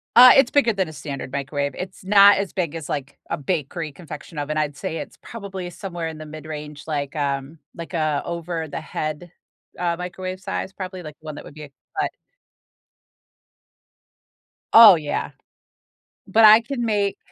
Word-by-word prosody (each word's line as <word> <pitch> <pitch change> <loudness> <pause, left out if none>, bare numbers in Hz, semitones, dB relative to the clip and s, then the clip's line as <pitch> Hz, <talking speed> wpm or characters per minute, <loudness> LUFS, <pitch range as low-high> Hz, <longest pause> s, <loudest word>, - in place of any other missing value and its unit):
Uh, 250 +1 +11
it's 270 -2 +5
bigger 240 -6 +3
than 190 -3 0
a 155 - -9
standard 140 -3 -6
microwave. 140 0 -2
It's 185 +1 -7
not 200 +1 +7
as 200 -1 -2
big 170 -4 -2
as, 160 -3 -6
like, 140 -1 -4
a - - -1
bakery 155 +1 -3
confection 150 0 -10
oven. 155 +1 -2
I'd 150 -2 -1
say 160 - -4
it's - - -8
probably 195 -5 -7
somewhere 175 -2 -5
in 160 -1 -6
the 155 - -8
mid-range, 150 -1 -8
like, 145 -1 -3
um 140 +1 -2 0.2
like, 170 +2 -8
a 155 -3 0
over 170 -1 -4
the 140 - -5
head, 155 +3 -5 0.5
uh, 170 -1 0
microwave 185 +1 -6
size, 190 - -4
probably, 185 -2 -7
like, 150 -1 -9
the - - -20
one 155 -1 -6
that - - -9
would - - -12
be 155 - -10
a 145 - -10 0.3
cut - - +1 2.6
Oh, 225 -5 +11
yeah. 150 -2 -3 1.0
But 225 0 +5
I 215 +2 +9
can 240 0 -3
make 205 -3 0
165 Hz, 175 wpm, -23 LUFS, 150-190 Hz, 2.6 s, Uh